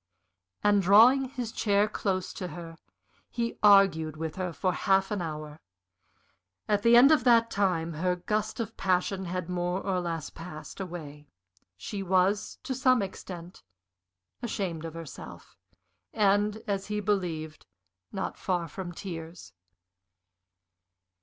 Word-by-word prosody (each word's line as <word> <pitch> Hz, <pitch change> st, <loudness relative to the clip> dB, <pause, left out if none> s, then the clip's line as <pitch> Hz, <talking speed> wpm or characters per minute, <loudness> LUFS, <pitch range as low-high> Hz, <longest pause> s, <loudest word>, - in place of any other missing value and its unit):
And, 205 Hz, -1 st, +4 dB
drawing 230 Hz, +8 st, +6 dB
his 250 Hz, -4 st, -5 dB
chair 205 Hz, -2 st, +2 dB
close 190 Hz, -3 st, -2 dB
to 185 Hz, -, -5 dB
her, 165 Hz, -2 st, -9 dB, 0.5 s
he 235 Hz, -1 st, -3 dB
argued 195 Hz, -7 st, +5 dB
with 160 Hz, 0 st, -4 dB
her 185 Hz, -2 st, -3 dB
for 185 Hz, +2 st, -1 dB
half 195 Hz, 0 st, +2 dB
an 205 Hz, -3 st, -1 dB
hour. 155 Hz, -2 st, -6 dB, 1.1 s
At 205 Hz, -1 st, +2 dB
the 230 Hz, +2 st, +5 dB
end 270 Hz, +5 st, +8 dB
of 300 Hz, -6 st, +4 dB
that 230 Hz, -1 st, +5 dB
time 175 Hz, -5 st, 0 dB
her 180 Hz, +3 st, 0 dB
gust 215 Hz, +4 st, -2 dB
of 225 Hz, -1 st, -4 dB
passion 185 Hz, +1 st, 0 dB
had 180 Hz, -1 st, -3 dB
more 180 Hz, 0 st, -1 dB
or 190 Hz, -2 st, -1 dB
less 165 Hz, -3 st, -4 dB
passed 165 Hz, 0 st, -9 dB
away; 155 Hz, -6 st, -7 dB, 0.5 s
she 195 Hz, -, -5 dB
was, 190 Hz, +2 st, +1 dB
to 265 Hz, -, -3 dB
some 255 Hz, -3 st, +3 dB
extent, 180 Hz, -2 st, -8 dB, 0.8 s
ashamed 190 Hz, -9 st, -3 dB
of 165 Hz, 0 st, -7 dB
herself, 165 Hz, -4 st, -10 dB, 0.6 s
and, 210 Hz, 0 st, +2 dB
as 200 Hz, -3 st, -2 dB
he 210 Hz, 0 st, -2 dB
believed, 175 Hz, -7 st, -2 dB, 0.4 s
not 195 Hz, -1 st, -4 dB
far 175 Hz, -3 st, -1 dB
from 175 Hz, +2 st, -7 dB
tears. 165 Hz, -, -8 dB
190 Hz, 135 wpm, -28 LUFS, 170-210 Hz, 1.1 s, end